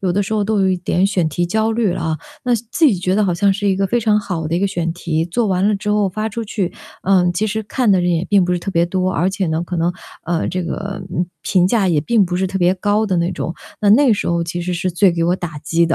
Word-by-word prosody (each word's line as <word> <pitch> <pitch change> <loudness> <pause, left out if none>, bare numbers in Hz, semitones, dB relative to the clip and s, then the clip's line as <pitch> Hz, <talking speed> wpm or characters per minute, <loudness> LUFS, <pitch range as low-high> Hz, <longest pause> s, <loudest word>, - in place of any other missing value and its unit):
有 190 - 0
的 205 - +1
时 200 - -5
候 215 -1 +1
都 210 0 0
有 190 - +3
一 185 - +1
点 180 +1 +1
选 180 -5 0
题 175 +3 -1
焦 220 +4 0
虑 225 -4 +1
啊。 160 -3 -2 0.3
那 250 -1 +2
自 235 +8 +1
己 255 - +4
觉 185 +1 -1
得 210 - +2
好 180 -3 0
像 200 +3 +3
是 205 +1 -1
一 190 - +2
个 195 0 +1
非 240 +5 0
常 215 -2 +3
好 175 -6 -3
的 165 - -1
一 - - +1
个 200 - +1
选 170 -3 -2
题， 165 -2 -2
做 220 +7 0
完 190 0 +1
了 210 - +2
之 210 +1 -3
后 210 -1 +2
发 215 +4 -3
出 230 +2 -5
去， 200 -4 -2 0.3
嗯， 185 -2 +3
其 200 +5 0
实 220 +1 -2
看 240 +1 0
的 190 - +3
人 175 0 +1
也 170 0 0
并 200 -3 +3
不 180 - 0
是 180 - 0
特 195 - -4
别 170 -2 +2
多。 185 +1 -1
而 180 0 +1
且 195 0 -2
呢， 160 +1 -1
可 175 +1 -4
能 170 +1 +1 0.3
啊， 170 -1 -1
这 185 -1 -2
个， 195 +2 -5
嗯， 175 - 0 0.2
评 180 -2 +2
价 210 -4 +2
也 160 -4 +2
并 215 +6 +2
不 180 0 -2
是 190 - 0
特 190 +1 -3
别 180 0 +3
高 205 +3 +1
的 190 -3 0
那 170 +1 0
种。 170 -1 -4 0.3
那 205 - +3
那 270 +6 +6
个 225 - +5
时 205 - -3
候 170 0 +1
其 170 +1 -4
实 180 +1 -2
是 185 +1 -1
最 180 +1 +3
给 170 0 -1
我 175 +2 +2
打 170 -5 -6
击 165 +3 +1
的， 165 0 +1
185 Hz, 325 characters per minute, -18 LUFS, 175-205 Hz, 0.3 s, 那